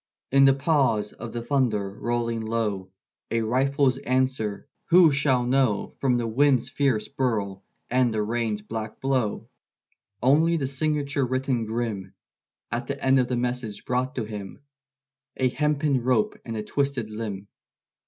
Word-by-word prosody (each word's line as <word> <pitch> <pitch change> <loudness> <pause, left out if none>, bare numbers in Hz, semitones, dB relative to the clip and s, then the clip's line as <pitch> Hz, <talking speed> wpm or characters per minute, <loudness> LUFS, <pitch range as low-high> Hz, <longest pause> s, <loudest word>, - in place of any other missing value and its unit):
In 135 +1 +6
the 135 -1 +6
pause 135 -8 +1
of 115 0 -8
the 120 -1 -4
thunder 120 -7 +1
rolling 115 +2 -2
low, 110 -4 -2 0.4
A 115 - 0
rifle's 135 +3 +2
answer 130 -5 -1 0.2
who 175 -2 +6
shall 140 -3 +2
know 125 -5 +1
From 125 -3 +2
the 120 - -1
wind's 130 +1 +2
fierce 130 -7 +1
burl 105 -8 -2 0.2
and 125 -1 +2
the 110 -1 0
rain's 110 -1 -2
blackblow? 115 +2 -2 0.7
Only 155 +7 +3
the 135 -4 -1
signature 140 0 0
written 130 -2 -1
grim 110 -4 -4 0.6
At - - -3
the - - -3
end 135 0 +3
of 125 - +2
the 125 - -1
message 120 -3 -3
brought 130 +3 -1
to 120 - -1
him 105 +2 -8 0.8
A 130 -1 +2
hempen 150 0 +1
rope 120 -3 +2
and 115 -1 -4
a 105 - -3
twisted 135 -3 -1
limb. 105 -3 -5
125 Hz, 145 wpm, -25 LUFS, 110-135 Hz, 0.8 s, In